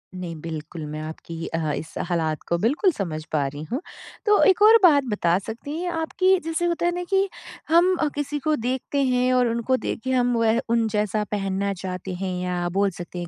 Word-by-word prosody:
नहीं 180 -2 -5
बिल्कुल, 160 0 -6
मैं 150 +1 -6
आपकी 160 +1 -7
अ, 160 -2 -2
इस 160 - -6 0.2
हालात 160 -3 0
को 170 - +1
बिल्कुल 285 - +2
समझ 170 - -4
पा 150 -3 +1
रही 145 +2 -7
हूँ। 260 +7 -1 0.4
तो 420 -1 +5
एक 380 0 +4
और 440 +2 +9
बात 295 -6 +6
बता 175 -4 +2
सकती 230 +9 -6
हैं 360 - -2
आप 325 -1 -3
कि 375 0 +5
जैसे 325 +1 -1
होता 345 0 0
है 350 - +3
ना 355 - -3
कि 390 0 +3 0.4
हम 345 +3 +5
अ, 310 - +3
किसी 290 0 -2
को 305 +2 +1
देखते 260 +3 -2
हैं 255 -1 +2
और 250 -1 +3
उनको 235 +3 0
देखे 260 +3 -3
हम 245 -1 +2
वह 230 0 +3
उन 230 -1 +2
जैसा 210 0 0
पहनना 195 0 -1
चाहते 185 0 -5
हैं 190 -1 -2
या 180 -1 -1
बोल 200 +2 +2
सकते 175 0 -8
हैं 175 - -5
225 Hz, 215 wpm, -24 LUFS, 175-295 Hz, 0.4 s, और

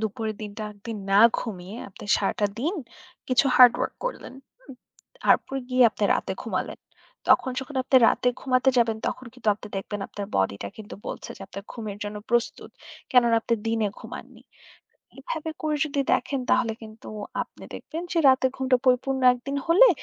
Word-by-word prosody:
দুপুরের 220 0 -3
দিনটা 210 +1 -6
একদিন, 215 +2 -7
না 200 - +5 0.2
ঘুমিয়ে 195 -2 -6
আপনি 195 - -12
সারাটা 205 +1 0
দিন 320 - -1 0.5
কিছু 255 +1 +4
hard 250 -2 +9
work - - -2
করলেন, - - -5 0.3
হুম। 270 - -13 0.5
তারপর 270 - +3
গিয়ে 255 0 +4
আপনি 210 - -2
রাতে - - -2
ঘুমালেন। - - -3 0.5
তখন 260 - +5
যখন 270 +1 -6
আপনি 260 - +3
রাতে 250 - +2
ঘুমাতে 260 0 +3
যাবেন, 225 -2 +2
তখন 255 - -4
কিন্তু 250 -4 -3
আপনি 210 - -11
দেখবেন 205 +1 -4
আপনার 200 -1 -6
body 95 +1 +1
টা 100 - -4
কিন্তু 215 -1 -9
বলছে - - -6
যে - - -18
আপনার 195 +1 -9
ঘুমের 215 -4 -6
জন্য 205 0 -5
প্রস্তুত, 235 -1 0 0.4
কেননা 235 -2 +5
আপনি 230 +1 0
দিনে 225 -1 +1
ঘুমাননি। - - -10 0.8
এভাবে 320 -10 -4
করে 305 -1 0
যদি 280 -1 -1
দেখেন 255 +2 0
তাহলে 245 -3 +3
কিন্তু 215 0 -11 0.3
আপনি - - -13
দেখবেন 325 +2 -6
যে, 335 - +1
রাতের 260 0 +4
ঘুমটা 260 -1 +2
পরিপূর্ণ 265 +1 +2
একদিন 275 +3 -5
হলে 380 +10 +7
240 Hz, 170 wpm, -25 LUFS, 210-265 Hz, 0.8 s, hard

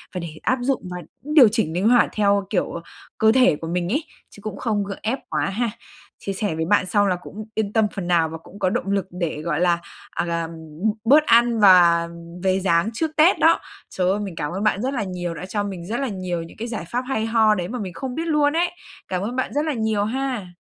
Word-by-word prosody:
và - - -1
để 170 - -5 0.2
áp 260 - +2
dụng 265 +2 0
và 180 - -4 0.3
cũng 300 - -4
điều 280 -7 +9
chỉnh 175 -8 0
linh 190 +5 +1
hoạt 245 -1 +5
theo, 200 -1 +2
kiểu, 180 -4 -1 0.4
cơ 220 0 +5
thể 255 -9 +4
của 165 +2 -7
mình 175 +1 -1
ấy, 295 +6 0 0.3
chứ 205 - -15
cũng 205 -2 -6
không 215 -4 -1
gượng 195 0 -6
ép 245 +5 -1
quá - - 0
ha. 225 +5 -1 0.6
Chia 195 - -2
sẻ 195 -3 -2
với 160 0 -1
bạn 200 +1 +3
xong 205 +2 +2
là 185 - +2
cũng 210 +4 -9
yên 215 -2 -1
tâm 220 -1 +4
phần 190 -3 -4
nào 170 -3 +3
và 165 - -6
cũng 185 +5 -15
có 185 - +2
động 195 - -2
lực 195 -2 0
để, 170 -4 -3
gọi 160 -1 -1
là, 175 -1 +3 0.3
à, 170 -1 -1
ừm, 165 0 -10 0.5
bớt 290 +6 +6
ăn 235 -2 +4
và 175 -4 +6 0.4
về 190 0 +2
dáng 170 +1 +2
trước 315 +6 -1
Tết 320 +4 +5
đó. 325 +1 +5 0.3
Trời 185 -1 0
ơi, 205 - 0
mình 195 -4 -5
cảm 150 -1 -3
ơn 190 +3 -3
bạn 210 -1 +1
rất 265 +2 -1
là 235 - -1
nhiều, 180 -3 -4
đã 180 - -7
cho 205 +2 -2
mình 190 -4 -6
rất 225 +7 -3
là 275 - -1
nhiều 185 -5 -3
những 165 - -13
cái 230 - -4
giải 220 -8 -5
pháp 245 - -1
hay 220 -5 -1
ho 220 -2 +4
đấy 175 -2 -3
mà 245 +5 -5
mình 185 -5 -5
không 250 +7 -5
biết 330 +1 -3
luôn 295 -2 +2
ấy. 345 +2 +1 0.4
Cảm 185 -1 -2
ơn 230 +5 -3
bạn 260 - -2
rất 295 +2 0
là 310 - 0
nhiều 220 -3 0
ha. 245 -6 -3
205 Hz, 255 wpm, -22 LUFS, 180-235 Hz, 0.6 s, điều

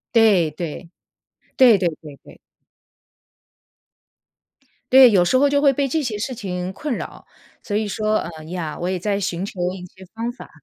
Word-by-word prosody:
对， 200 -8 +4
对， 165 +2 -7 0.7
对 245 -5 +6
对 180 -2 +1
对 150 -3 -11
对。 - - -16 2.5
对， 260 -1 +9
有 190 -5 +3
时 255 - +3
候 285 +2 +3
就 285 0 +1
会 280 -2 +4
被 275 +1 0
这 310 +3 -1
些 225 -5 -3
事 255 +4 -4
情 180 -3 -5
困 285 +5 -4
扰， - - -8 0.4
所 205 - -4
以 215 0 0
说， 215 +1 0
嗯 160 -2 -7
，yeah， 165 -2 -5
我 175 - -3
也 185 -1 -2
在 200 +2 -1
寻 185 -2 -3
求 200 - -9
一 185 -1 -9
些 190 +2 -16
方 230 +2 -3
法。 245 - -13
205 Hz, 205 characters per minute, -21 LUFS, 180-245 Hz, 2.5 s, 对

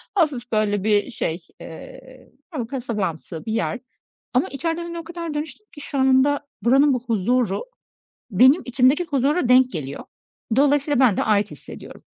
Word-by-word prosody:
hafif, 275 -9 0
böyle, 205 -2 +1
bir 210 +3 +1
şey, 165 -5 -2 0.2
eee, 260 +10 -12 0.2
hani, 245 -7 -4
kasabamsı 210 - -4
bir 220 - -3
yer 230 +2 -1 0.5
ama 255 - +2
içeriden, 330 +5 -3
hani, 340 0 -6
o - - -7
kadar 335 -2 -6
dönüştüm 305 +8 -6
ki 290 - -10
şu 280 - -5
anda 265 +2 +3 0.2
buranın 270 +4 +4
bu 250 -1 -2
huzuru 230 - 0 0.7
benim 260 - +5
içimdeki 260 +6 +3
huzura 280 -1 0
denk 255 0 +5
geliyor. 140 -4 -5 0.5
Dolayısıyla 285 0 +2
ben 240 -7 +4
de - - +1
ait 210 -1 +1
hissediyorum. - - -11
260 Hz, 155 wpm, -22 LUFS, 220-290 Hz, 0.7 s, benim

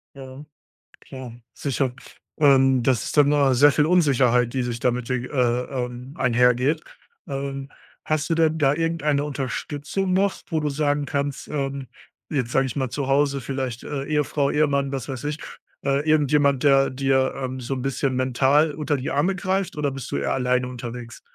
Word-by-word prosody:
Ja, 135 +1 -10 0.6
klar, 130 -3 -9 0.2
sicher, 135 -2 -1 0.5
ähm, 135 -3 +5
das 125 -3 +1
ist - - -5
dann 145 -1 +6
no 145 -2 +3
äh, 130 - +3
sehr 145 +3 +6
viel 150 +1 +2
Unsicherheit, 130 -8 +3
die 130 - 0
sich 120 -1 -4
damit, 125 0 -1
äh, 130 - +2
ähm, 125 +1 -2
einhergeht. 125 +4 +2 0.5
Ähm, 135 0 -4 0.3
hast 155 +1 -1
du - - +3
denn 160 -1 +2
da 140 -1 +3
irgendeine 155 -3 0
Unterstützung 145 +6 -3
noch, 195 +1 +2
wo 160 -2 0
du 150 -1 -1
sagen 145 0 0
kannst, 140 -1 -3
ähm 140 -2 -3 0.5
jetzt 125 -5 -1
sage 135 - +3
ich 130 - -5
mal 130 -2 0
zu 140 -2 -3
Hause, 140 0 +2
vielleicht, 130 -2 -4
äh, 140 -2 -4
Ehefrau, 150 -1 0
Ehemann, 140 -2 +1
was 135 0 -4
weiß 130 0 -5
ich, 150 +1 -3 0.5
äh, 140 +3 0
irgendjemand, 145 -2 +3
der 135 -1 +5
dir, 130 0 +1
ähm, 130 -1 -4
so 130 +2 -3
'n 130 - -4
bisschen 135 0 -1
mental 135 +4 +2
unter 150 0 -1
die 130 - -4
Arme 160 +8 +1
greift, 190 -2 -2
oder 145 -2 0
bist 135 -2 -7
du - - 0
eher - - -1
alleine 125 0 +1
unterwegs? 120 -1 -8
135 Hz, 175 wpm, -23 LUFS, 130-150 Hz, 0.6 s, dann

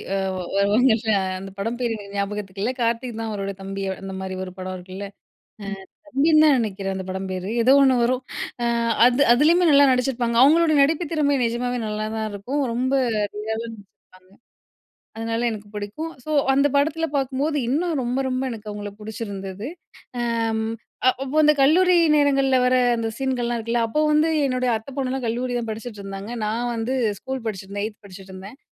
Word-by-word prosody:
அ - - +1 0.4
வருவாங்கல்ல 220 +3 +3 0.3
அந்த 195 +1 -8
படம் 225 +4 -2
பேர் 235 -2 0
எனக்கு 200 -1 -10
ஞாபகத்துக்குகில்ல. 200 +2 -2
கார்த்திக் 230 0 -1
தான் 225 -1 -3
அவரோட 200 -1 -3
தம்பி. 195 0 -5 0.2
அந்த 195 0 -6
மாதிரி 190 0 -5
ஒரு 185 - -7
படம் 185 0 -5
இருக்குல. 185 +2 -8 1.0
அ - - -24
தம்பின்னு 310 +3 +4
தான் 295 -3 +6
நினைக்கிறேன் 195 -3 -3
அந்த 190 -1 -5
படம் 190 +1 -4
பேர், 185 +1 -4 0.2
ஏதோ 260 +3 +6
ஒண்ணு 265 -1 +5
வரும். 255 +2 0 0.4
ஆ - - +1 0.4
அது 250 +2 +2
அதிலேயுமே 330 +7 +4
நல்லா 280 -1 +7
நடிச்சிருப்பாங்க. 250 -2 0
அவங்களோட 320 +3 +5
நடிப்பு 320 +4 +2
திறமை 285 -3 +2
நிஜமாவே 245 +1 -1
நல்லாதான் 215 +1 -3
இருக்கும். 245 +9 -3
ரொம்ப 260 +3 0 0.4
ரியலா 215 +1 -3
நடிச்சிருப்பாங்க. 195 -4 -15 0.9
அதனால 225 +1 -2
எனக்கு 210 -2 -7
பிடிக்கும். 210 +11 -5
ஸோ 310 - -4 0.2
அந்த 280 +1 +4
படத்தில 310 +3 +2
பார்க்கும்போது, 275 +3 -1
இன்னும் 315 +2 0
ரொம்ப 245 +2 -1
ரொம்ப 255 0 -1
எனக்கு 215 -2 -8
அவங்கள 205 0 -6
பிடிச்சிருந்தது. 200 -1 -6 0.5
ம் 225 -2 0 0.4
அப்போ 270 +3 -3
அந்த 300 0 +6
கல்லூரி 355 +7 +5 0.2
நேரங்களில் 275 -3 +3
வர 250 0 +3 0.2
அந்த 225 - -1
சீன்கள்லாம் 245 -3 -1
இருக்குல்ல, 230 +1 -1
அப்போ 300 +7 -1
வந்து 305 +2 +3 0.2
என்னுடைய 255 -1 0
அத்தை 220 +5 -6
பொண்ணுலாம் 260 -1 -2
கல்லூரி 245 +2 -2
தான் 230 - -5
படிச்சுட்ருந்தாங்க. 205 -2 -7 0.2
நான் 230 +3 -1
வந்து 230 +3 -2 0.3
ஸ்கூல் 265 -2 -5
படிச்சுட்ருந்தேன். 200 -1 -4
8 215 -1 -8
படிச்சுட்ருந்தேன். 195 +3 -11
230 Hz, 160 wpm, -23 LUFS, 205-270 Hz, 1.0 s, நல்லா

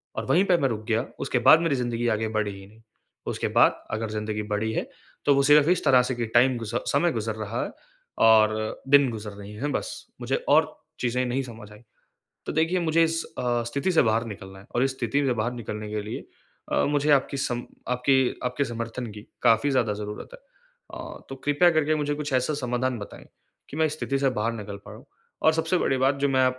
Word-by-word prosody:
और - - -3
वहीं 185 +4 +3
पे 180 -2 +4
मैं 135 - +1
रुक 110 -2 -4
गया 115 +2 +1
उसके 125 - 0
बाद 160 - +9
मेरी 165 -4 +1
ज़िंदगी 120 -1 -1
आगे 110 +1 -2
बढ़ी 105 -1 0
ही 95 - -12
नहीं। 110 +2 -20 0.5
उसके - - -2
बाद - - +5
अगर 110 0 -2
ज़िंदगी 105 0 -3
बढ़ी 110 +2 -1
है, - - -2 0.4
तो 145 - +5
वो 140 - +3
सिर्फ 145 +1 +6
इस 180 - +2
तरह 130 -2 +6
से 130 - -1
कि 120 - -2
टाइम 125 +1 +5
गुज 115 0 -6
समय 140 +7 +1
गुज़र 110 -1 -3
रहा 110 +2 -3
है - - -5 0.6
और 110 -1 +3
दिन 140 -2 +6
गुज़र 105 -2 -6
रही 100 +1 -10
हैं 140 +7 -3
बस। - - -3 0.3
मुझे - - 0
और - - +5 0.3
चीज़ें 125 +1 0
नहीं 130 +2 -1
समझ 110 -4 -11
आई। 105 - -13 0.7
तो - - -3
देखिए 165 +4 +1
मुझे 165 0 +3
इस 165 0 0 0.2
अ, 120 -1 0
स्थिति 140 +10 -1
से 165 - +5
बाहर 115 0 +1
निकलना 95 -2 -9
है 95 - -15
और 120 - +3
इस 135 - +1
स्थिति 135 +4 0
से 125 - +2
बाहर 115 +1 -1
निकलने 110 -3 -6
के 105 0 -3
लिए 105 - -6 0.5
अ, - - +2
मुझे 145 +1 +1
आपकी 140 0 +2
सम 120 -2 -2 0.3
आपकी 130 +1 +2
आपके 125 +3 -1
समर्थन 115 +1 -5
की 105 0 -10 0.2
काफ़ी 115 +6 +4
ज़्यादा 120 -5 +1
ज़रूरत 105 0 -7
है। - - -11 0.5
अ, - - -8
तो 135 - -6
कृपया 145 +5 +4
करके 155 -1 +2
मुझे 145 -1 -1
कुछ 145 -2 -4
ऐसा 130 +4 +1
समाधान 125 -3 -2
बताएँ, 100 - -10 0.4
कि 145 - -7
मैं 160 - +3
इस 155 - -1
स्थिति 140 -3 -1
से 135 -1 +3
बाहर 115 -1 -1
निकल 105 -3 -7
पाऊँ। - - -12 0.4
और 160 - +5
सबसे 160 +3 +1
बड़ी 135 - +1
बात 135 +2 +2
जो - - +4
मैं 130 -1 +3
125 Hz, 220 wpm, -25 LUFS, 110-145 Hz, 0.7 s, बाद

